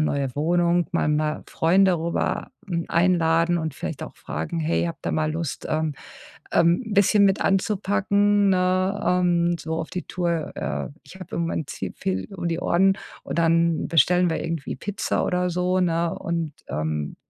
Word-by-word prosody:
neue 140 Hz, -4 st, -1 dB
Wohnung.” 175 Hz, +2 st, +2 dB
Mal -, -, +1 dB
mal 150 Hz, 0 st, 0 dB
Freunde 185 Hz, +1 st, +3 dB
rüber, 170 Hz, +1 st, -2 dB, 0.2 s
hm, 170 Hz, -3 st, -2 dB
einladen 170 Hz, -1 st, +3 dB
und 160 Hz, -3 st, -3 dB
vielleicht -, -, -5 dB
auch -, -, -8 dB
fragen: 80 Hz, -, -4 dB
„Hey, 160 Hz, +2 st, 0 dB
habt 165 Hz, -3 st, -6 dB
ihr -, -, 0 dB
mal 155 Hz, 0 st, 0 dB
Lust, 160 Hz, -3 st, -4 dB
ähm, 155 Hz, -1 st, 0 dB, 0.6 s
ähm, 170 Hz, +6 st, +3 dB
'n 215 Hz, -, -4 dB
bisschen 200 Hz, +1 st, +5 dB
mit 195 Hz, 0 st, +1 dB
anzupacken“, 200 Hz, +1 st, +2 dB
ne, 185 Hz, +2 st, +1 dB
ähm, 175 Hz, -1 st, +2 dB
so 160 Hz, +1 st, -4 dB
auf 165 Hz, 0 st, -4 dB
die 180 Hz, -, -4 dB
Tour. 170 Hz, -3 st, -2 dB
„Äh, -, -, -3 dB, 0.2 s
ich -, -, -13 dB
habe 185 Hz, -, -8 dB
im 170 Hz, -, 0 dB
Moment 160 Hz, -3 st, -2 dB
zu 95 Hz, -, -5 dB
viel 95 Hz, 0 st, -2 dB
um 175 Hz, -2 st, -3 dB
die 165 Hz, 0 st, -1 dB
Ohren. 190 Hz, +3 st, +3 dB, 0.3 s
Und -, -, -4 dB
dann 165 Hz, 0 st, +2 dB
bestellen 175 Hz, +2 st, +4 dB
wir -, -, -2 dB
irgendwie 165 Hz, -4 st, -4 dB
Pizza 205 Hz, +9 st, -2 dB
oder 180 Hz, 0 st, 0 dB
so”, 180 Hz, +1 st, +1 dB
ne? 170 Hz, -1 st, +1 dB
Und, 165 Hz, -3 st, -3 dB
ähm, 75 Hz, 0 st, -3 dB
170 Hz, 175 wpm, -24 LUFS, 160-185 Hz, 0.6 s, bisschen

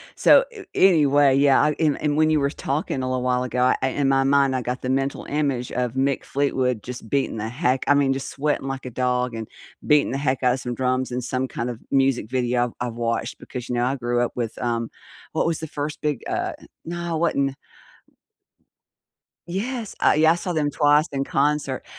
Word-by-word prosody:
So -, -, +6 dB
a 420 Hz, -4 st, -11 dB
anyway, 145 Hz, -7 st, +5 dB
yeah, 140 Hz, -1 st, +5 dB
I 150 Hz, 0 st, +2 dB
and 155 Hz, -3 st, +1 dB
and 145 Hz, -1 st, +1 dB
when 155 Hz, 0 st, +4 dB
you 155 Hz, -1 st, +3 dB
were 140 Hz, -, +1 dB
talking 140 Hz, -1 st, -3 dB
a -, -, -2 dB
little 130 Hz, -1 st, -1 dB
while 125 Hz, 0 st, +1 dB
ago, 125 Hz, 0 st, -3 dB, 0.2 s
I 130 Hz, -, +2 dB
in 140 Hz, +1 st, 0 dB
my 135 Hz, 0 st, +3 dB
mind, 135 Hz, -1 st, +3 dB
I 130 Hz, -, -1 dB
got 125 Hz, +1 st, -4 dB
the 130 Hz, -, -3 dB
mental 135 Hz, +1 st, -1 dB
image 140 Hz, -4 st, -1 dB
of 125 Hz, -1 st, -2 dB
Mick 135 Hz, +1 st, 0 dB
Fleetwood 130 Hz, -5 st, -1 dB
just 120 Hz, -3 st, -8 dB
beating 140 Hz, -4 st, 0 dB
the 110 Hz, +1 st, -3 dB
heck 130 Hz, 0 st, 0 dB
I 145 Hz, -, +6 dB
mean, 140 Hz, -1 st, +3 dB
just 135 Hz, 0 st, -5 dB
sweating 145 Hz, -1 st, -1 dB
like 135 Hz, -1 st, -5 dB
a 125 Hz, -, -6 dB
dog 125 Hz, 0 st, 0 dB
and 110 Hz, -1 st, -5 dB, 0.4 s
beating 150 Hz, -3 st, +3 dB
the 135 Hz, -, -1 dB
heck 135 Hz, -2 st, -1 dB
out 125 Hz, -, +4 dB
of 130 Hz, -, -3 dB
some 125 Hz, -1 st, -4 dB
drums 130 Hz, 0 st, -1 dB
and 125 Hz, 0 st, -3 dB
some 130 Hz, +1 st, -2 dB
kind 120 Hz, -1 st, -4 dB
of 120 Hz, -2 st, -6 dB
music 135 Hz, -4 st, +2 dB
video 125 Hz, -1 st, +1 dB
I've 125 Hz, 0 st, -5 dB
I've -, -, -8 dB
watched 115 Hz, 0 st, -2 dB
because, 125 Hz, -2 st, -8 dB
you 125 Hz, -, -1 dB
know, 120 Hz, -, +1 dB
I 130 Hz, +2 st, 0 dB
grew 120 Hz, -2 st, -1 dB
up -, -, -2 dB
with, 115 Hz, -2 st, -3 dB
um 115 Hz, -1 st, -1 dB, 0.4 s
what -, -, +1 dB
was 165 Hz, -2 st, -1 dB
the 160 Hz, -, -5 dB
first 145 Hz, +1 st, -5 dB
big, 150 Hz, -5 st, -1 dB
uh -, -, -2 dB, 0.3 s
no, 170 Hz, 0 st, -3 dB
it -, -, -1 dB
wasn't 140 Hz, -5 st, +1 dB, 1.9 s
Yes, 220 Hz, +5 st, -4 dB
I -, -, +4 dB
yeah, 160 Hz, +1 st, +5 dB
I -, -, +1 dB
saw 175 Hz, +1 st, -3 dB
them 150 Hz, -2 st, 0 dB
twice 150 Hz, +2 st, +3 dB
in 135 Hz, -1 st, -2 dB
concert, 140 Hz, -1 st, 0 dB
135 Hz, 220 wpm, -23 LUFS, 125-145 Hz, 1.9 s, So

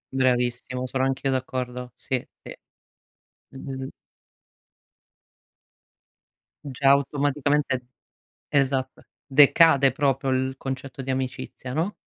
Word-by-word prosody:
Bravissimo, 125 Hz, 0 st, 0 dB
sono 130 Hz, +1 st, -1 dB
anch'io 135 Hz, 0 st, -1 dB
d'accordo. 125 Hz, -1 st, -3 dB
Sì, 130 Hz, -2 st, -3 dB, 0.2 s
sì. -, -, -9 dB, 1.0 s
Mh-mh. 135 Hz, 0 st, -7 dB, 2.8 s
Già 135 Hz, 0 st, +2 dB
automaticamente 140 Hz, -2 st, +1 dB, 0.6 s
esatto, 135 Hz, -2 st, 0 dB, 0.2 s
decade 140 Hz, -1 st, +6 dB
proprio 135 Hz, -1 st, 0 dB
il 130 Hz, 0 st, 0 dB
concetto 135 Hz, 0 st, -6 dB
di 135 Hz, 0 st, -3 dB
amicizia, 130 Hz, -1 st, -4 dB
no? 165 Hz, +9 st, -1 dB
130 Hz, 85 wpm, -25 LUFS, 130-140 Hz, 2.8 s, decade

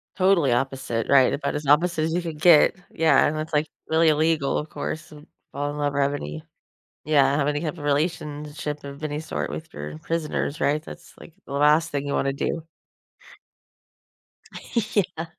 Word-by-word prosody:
Totally 185 Hz, -8 st, +3 dB
opposite, 125 Hz, -2 st, -1 dB
right? 135 Hz, -2 st, +5 dB
About 140 Hz, 0 st, -2 dB
as 150 Hz, 0 st, -4 dB
opposite 160 Hz, +2 st, +3 dB
as 160 Hz, -, -1 dB
you 175 Hz, -, 0 dB
could 160 Hz, -3 st, -6 dB
get. 165 Hz, -3 st, +6 dB, 0.2 s
Yeah. 160 Hz, -1 st, +4 dB
And 155 Hz, +1 st, 0 dB
it's, 155 Hz, +1 st, -5 dB
like, 150 Hz, +1 st, +2 dB, 0.2 s
really 160 Hz, 0 st, +4 dB
illegal, 155 Hz, -2 st, +2 dB
of 150 Hz, -, -4 dB
course, 155 Hz, 0 st, -5 dB
and 150 Hz, 0 st, -14 dB, 0.2 s
fall 145 Hz, +1 st, -3 dB
in 150 Hz, -, -7 dB
love 145 Hz, -1 st, -1 dB
with 140 Hz, 0 st, +1 dB
any 75 Hz, -, -6 dB, 0.6 s
yeah. 140 Hz, -2 st, +3 dB
Have 140 Hz, -, +1 dB
any 145 Hz, 0 st, -1 dB
type 165 Hz, 0 st, -3 dB
of 145 Hz, -, -7 dB
relationship 150 Hz, -1 st, -2 dB
of 140 Hz, +1 st, -9 dB
any 150 Hz, 0 st, -3 dB
sort 155 Hz, -, -4 dB
with 160 Hz, 0 st, -7 dB
your 75 Hz, +1 st, -7 dB
prisoners, 155 Hz, -, -2 dB
right? 150 Hz, +2 st, +1 dB
That's, -, -, -12 dB
like, 170 Hz, -, -13 dB
the 140 Hz, -, -8 dB
last 150 Hz, +3 st, +4 dB
thing 140 Hz, 0 st, -2 dB
you 140 Hz, -, -3 dB
wanna 135 Hz, 0 st, 0 dB
do. 160 Hz, +3 st, -3 dB, 2.3 s
Yeah. 175 Hz, -5 st, 0 dB
150 Hz, 180 wpm, -24 LUFS, 140-160 Hz, 2.3 s, get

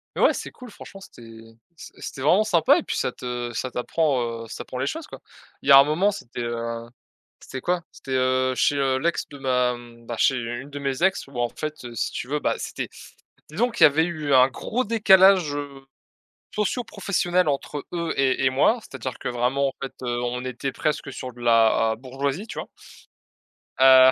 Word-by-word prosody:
Mais -, -, -2 dB
ouais -, -, +5 dB
c'est -, -, -6 dB
cool 250 Hz, -1 st, -12 dB
franchement 195 Hz, -, -12 dB
c'était, 115 Hz, -11 st, -13 dB, 0.4 s
c'est -, -, -11 dB
c'était 135 Hz, -, -7 dB
vraiment 180 Hz, +10 st, +4 dB
sympa 215 Hz, -, +4 dB
et 340 Hz, -, -2 dB
puis -, -, -3 dB
ça 125 Hz, -, -1 dB
te 120 Hz, -1 st, -5 dB
ça 130 Hz, +3 st, -3 dB
t'apprend, 125 Hz, -3 st, -1 dB
heu, -, -, -10 dB
ça -, -, -7 dB
prend 125 Hz, -, -7 dB
les 130 Hz, -, -1 dB
choses 320 Hz, -, -4 dB
quoi. -, -, -10 dB, 0.4 s
Il -, -, -3 dB
y -, -, +8 dB
a 135 Hz, -, +11 dB
un 140 Hz, -, +7 dB
moment 175 Hz, +8 st, +2 dB
c'était, 125 Hz, -, -7 dB
heu, 115 Hz, 0 st, -3 dB, 0.6 s
c'était 130 Hz, -, -8 dB
quoi? 180 Hz, +3 st, 0 dB
C'était, 135 Hz, -, -7 dB
heu, 130 Hz, 0 st, +1 dB
chez, 145 Hz, -, +2 dB
heu, 135 Hz, -1 st, +1 dB
l'ex 170 Hz, +5 st, -1 dB
de 145 Hz, -, -10 dB
ma 125 Hz, -2 st, +1 dB
mmh 120 Hz, -1 st, -15 dB
bah 120 Hz, -, -4 dB
chez 135 Hz, -, +3 dB
une 120 Hz, +4 st, -5 dB
de 145 Hz, -, -6 dB
mes 135 Hz, +2 st, -2 dB
ex 190 Hz, -5 st, +1 dB
où 135 Hz, -3 st, -7 dB
en 120 Hz, 0 st, +1 dB
fait 155 Hz, +4 st, -5 dB, 0.2 s
si 115 Hz, -, -2 dB
tu -, -, -5 dB
veux, 150 Hz, +3 st, -1 dB
bah -, -, 0 dB
c'était -, -, -5 dB, 0.6 s
donc 230 Hz, +9 st, -1 dB
il -, -, +9 dB
y -, -, +12 dB
avait 155 Hz, +2 st, +3 dB
eu 155 Hz, -5 st, -1 dB
un 130 Hz, 0 st, +7 dB
gros 230 Hz, -, -2 dB
décalage, 190 Hz, -, +5 dB
heu, 140 Hz, -2 st, -7 dB, 0.7 s
socio-professionnel 200 Hz, -5 st, 0 dB
entre 145 Hz, 0 st, -2 dB
eux 170 Hz, -2 st, -2 dB
et 135 Hz, -1 st, +2 dB
et 130 Hz, -, +4 dB
moi, 140 Hz, -, +3 dB
c'est-à-dire 130 Hz, -, -7 dB
que -, -, -4 dB
vraiment 125 Hz, +3 st, 0 dB
en -, -, -10 dB
fait 135 Hz, -, -5 dB
on 120 Hz, 0 st, -2 dB
était 130 Hz, +1 st, -4 dB
presque 150 Hz, -, -2 dB
sur 130 Hz, -, -6 dB
de 120 Hz, -, -16 dB
la 115 Hz, -1 st, +3 dB
bourgeoisie, 135 Hz, -, -4 dB
tu -, -, -6 dB
vois? -, -, -6 dB, 1.1 s
Heu, 130 Hz, 0 st, +8 dB
135 Hz, 205 wpm, -24 LUFS, 125-165 Hz, 1.1 s, y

